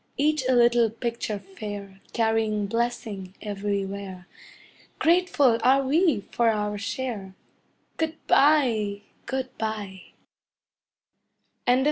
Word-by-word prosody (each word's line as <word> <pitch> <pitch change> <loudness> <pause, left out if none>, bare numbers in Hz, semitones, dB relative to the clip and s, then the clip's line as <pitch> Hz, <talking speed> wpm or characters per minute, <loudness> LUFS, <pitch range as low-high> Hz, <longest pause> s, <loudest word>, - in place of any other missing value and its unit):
Each 300 0 +2
a - - +5
little 240 -1 +5
picture 230 -1 -3
fair, 200 0 -8
Carrying 220 -2 +1
blessing 215 -4 -3
everywhere. 200 -2 -4 0.7
Grateful 320 -8 +3
are 270 +2 +5
we 305 - +3
for 235 -1 +3
our 210 -1 -1
share 220 -3 -4 0.6
Good 320 0 -1
bye! 235 -9 +3 0.3
Good 260 -1 -3
bye! 210 -4 -4 1.7
'CHILLA. 250 +1 +5
225 Hz, 95 wpm, -26 LUFS, 200-255 Hz, 1.7 s, a